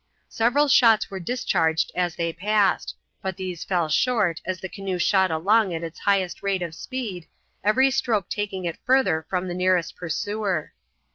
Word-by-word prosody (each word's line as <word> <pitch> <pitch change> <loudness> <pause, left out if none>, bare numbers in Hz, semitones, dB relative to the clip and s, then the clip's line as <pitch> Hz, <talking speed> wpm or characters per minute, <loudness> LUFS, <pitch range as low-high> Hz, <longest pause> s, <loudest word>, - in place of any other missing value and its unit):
Several 245 +6 +2
shots 240 -8 +5
were 190 - -5
discharged 170 -6 0
as 175 -2 -1
they 170 -1 -2
passed, 205 +3 +1 0.3
but 190 -1 -4
these 185 -3 -5
fell 175 -4 0
short 195 - +1
as 185 -1 -3
the 190 - -5
canoe 195 -1 -4
shot 190 +1 +3
along 190 +4 +2
at 165 - -5
its 165 0 -7
highest 195 -3 0
rate 195 -2 -1
of 170 -2 -5
speed, 210 -5 -6 0.4
every 260 +6 +4
stroke 240 -7 0
taking 195 -3 -3
it 170 - -4
further 250 -12 +2
from 180 -1 -1
its 175 - -4
nearest 180 -2 +1
pursuer. 190 0 -3
190 Hz, 165 wpm, -24 LUFS, 175-215 Hz, 0.4 s, shots